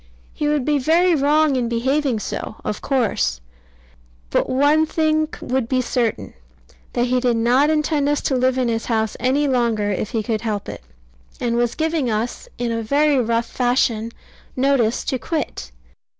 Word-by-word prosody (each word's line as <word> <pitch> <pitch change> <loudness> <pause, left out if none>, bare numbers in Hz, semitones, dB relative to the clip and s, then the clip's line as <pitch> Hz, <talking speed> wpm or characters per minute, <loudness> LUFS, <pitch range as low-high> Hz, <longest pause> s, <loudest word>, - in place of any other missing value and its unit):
He 295 - -2
would 295 -3 +1
be 295 -1 +2
very 340 +6 +3
wrong 300 0 +3
in 245 -2 0
behaving 260 +2 0
so, 215 - -5
of 210 - -3
course: 230 - 0 0.9
but - - +1
one 290 +4 +3
thing 310 -1 +1
would 255 -2 -1
be 260 - +1
certain, 230 - -1 0.6
that 240 - +1
he 250 0 +1
did 245 -2 +1
not 250 +6 +3
intend 300 -2 +1
us 295 - +1
to 270 - 0
live 255 0 +1
in 255 -2 +1
his 225 -1 -1
house 220 -2 -1
any 270 +4 +1
longer 230 -5 +1
if 200 +2 -2
he 225 -3 -2
could 220 0 -2
help 215 -3 -3
it; - - -7 0.6
and 235 -1 -1
was 240 0 0
giving 315 -5 0
us, 230 - -3
in 240 -1 -2
a 230 0 -1
very 285 +5 +2
rough 230 -1 0
fashion, 235 -2 0 0.4
notice 255 -3 +1
to 260 - -2
quit. 270 - -4
255 Hz, 170 wpm, -21 LUFS, 230-290 Hz, 0.9 s, very